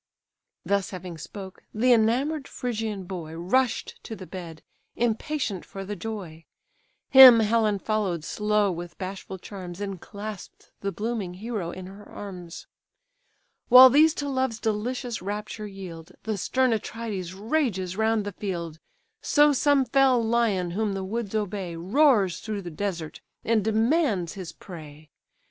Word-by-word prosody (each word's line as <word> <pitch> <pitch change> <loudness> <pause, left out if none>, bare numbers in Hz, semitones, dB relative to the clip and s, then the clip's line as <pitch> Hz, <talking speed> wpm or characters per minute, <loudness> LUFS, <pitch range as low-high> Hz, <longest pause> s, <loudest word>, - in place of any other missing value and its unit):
Thus 200 -2 +1
having 180 -3 -7
spoke, 190 +3 -9
the 245 +3 +4
enamour'd 265 +7 +1
Phrygian 220 -5 -3
boy 175 -4 -7
Rush'd 235 +10 0
to 220 - -6
the 190 - -9
bed, 170 -4 -9 0.3
impatient 235 - -1
for 195 0 -8
the 205 +2 -4
joy. 175 -5 -7 0.7
Him 260 -3 +11
Helen 215 -1 +2
follow'd 195 -6 -1
slow 210 +1 +1
with 175 0 -7
bashful 190 0 -6
charms, 185 -1 -8
And 195 -3 -5
clasp'd 205 -1 -9
the 200 - -2
blooming 210 -4 -3
hero 210 -3 -4
in 185 +1 -7
her 195 +2 -11
arms. 180 -4 -8 1.0
While 255 +1 +10
these 310 +4 +5
to 285 - -3
love's 260 -4 -1
delicious 230 +2 -2
rapture 210 +2 -5
yield, 185 -3 -9
The 220 -1 -2
stern 255 +6 +1
Atrides 210 -5 -4
rages 205 - -1
round 220 0 +1
the 205 - -3
field: 170 -5 -5 0.4
So 295 0 +4
some 285 0 +3
fell 265 -2 +4
lion 220 -6 +1
whom 205 +2 -1
the 195 0 -3
woods 220 +1 -4
obey, 195 -4 -2
Roars 195 - +3
through 210 -3 -5
the 175 - -6
desert, 170 -2 -4 0.2
and 225 -2 +2
demands 220 - +1
his 190 -4 -7
prey. 155 -4 -12
205 Hz, 140 wpm, -26 LUFS, 185-230 Hz, 1.0 s, Him